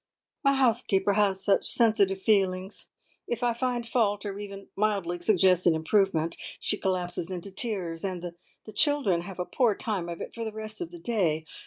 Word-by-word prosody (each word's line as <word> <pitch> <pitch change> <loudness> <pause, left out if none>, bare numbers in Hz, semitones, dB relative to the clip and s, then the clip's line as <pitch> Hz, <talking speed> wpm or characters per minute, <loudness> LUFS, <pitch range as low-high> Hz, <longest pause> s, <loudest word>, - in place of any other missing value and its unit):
"My 275 0 +4
housekeeper 225 -6 +2
has 195 -2 +1
such 200 -2 +3
sensitive 205 -5 +3
feelings. 190 -2 +1 0.4
If 240 +1 -3
I 240 -1 +2
find 240 -1 -2
fault, 210 -4 +1
or 200 0 -4
even 200 -1 -8
mildly 195 -4 0
suggest 185 -1 +4
an 165 - +5
improvement, 165 -1 +1 0.2
she - - +1
collapses 180 -2 -2
into 185 +1 -6
tears, 185 -6 -3
and 180 -3 -4 0.3
the 215 - -9
children 270 - +3
have 180 +1 -8
a 180 - -2
poor 235 -2 +2
time 195 -7 -3
of 170 - -6
it - - -7
for 230 - -5
the 220 - -3
rest 215 +3 -6
of 345 - -4
the 350 - -10
day. 185 - 0
200 Hz, 180 wpm, -28 LUFS, 180-225 Hz, 0.4 s, an